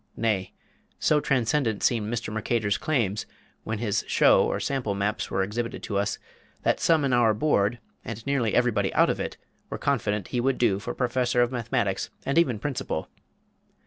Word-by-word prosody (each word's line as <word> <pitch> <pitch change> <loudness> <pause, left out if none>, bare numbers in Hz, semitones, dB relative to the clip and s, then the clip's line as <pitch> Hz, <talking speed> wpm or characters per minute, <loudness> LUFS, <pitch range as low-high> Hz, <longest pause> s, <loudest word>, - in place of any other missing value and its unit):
Nay, 105 -5 0 0.5
so 150 - +3
transcendent 125 -4 0
seemed 110 -3 +1
Mr. 115 -2 -3
Merchator's 110 -1 0
claims, 115 -10 0 0.4
when 110 0 -3
his 105 -2 -1
show - - +5
or - - -1
sample 125 -7 -1
maps 100 +2 -1
were 95 - 0
exhibited 115 +4 -4
to 100 -2 -1
us, 100 - -1 0.5
that - - +2
some 160 -4 +3
in 130 - +1
our 115 -3 +4
Board, 110 -3 +2 0.3
and 115 -1 -7
nearly 135 -6 +1
everybody 110 -6 +2
out - - +5
of - - -4
it, - - -4 0.3
were - - -4
confident 105 -2 -1
he 120 - 0
would 135 +1 +1
do 100 -5 +2
for 110 - -5
Professor 125 -1 +1
of 120 - -1
Mathematics 115 -5 -1 0.2
and 140 +4 +3
even 130 -9 +2
Principal. 135 +3 -3
115 Hz, 175 wpm, -26 LUFS, 105-125 Hz, 0.5 s, show